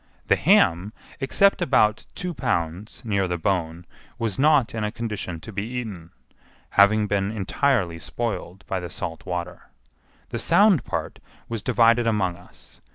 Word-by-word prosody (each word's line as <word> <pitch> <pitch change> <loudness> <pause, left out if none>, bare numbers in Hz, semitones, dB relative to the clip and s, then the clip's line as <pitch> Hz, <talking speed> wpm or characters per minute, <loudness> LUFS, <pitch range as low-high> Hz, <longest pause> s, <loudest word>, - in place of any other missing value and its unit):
The - - +6
ham, 90 +6 +3 0.3
except 195 +9 +3
about 110 -4 +2
two 180 -2 -4
pounds 100 - -3
near 100 -4 0
the 90 0 -2
bone, 85 -1 -2 0.3
was 115 -2 -2
not 145 -4 +4
in 110 -1 -3
a 105 - -1
condition 105 -7 -5
to 100 - -9
be 100 - -2
eaten, 110 -7 -6 0.6
having 105 +2 +5
been 100 -1 0
entirely 105 -4 0
spoiled 95 -1 -5
by 95 - -2
the 90 -1 -6
salt 80 +2 -6
water. 90 0 -5 0.6
The 115 - -4
sound 175 - +4
part - - -4 0.3
was 115 -2 -4
divided 115 0 +3
among 100 -6 +1
us. 90 - -16
105 Hz, 150 wpm, -24 LUFS, 90-120 Hz, 0.6 s, The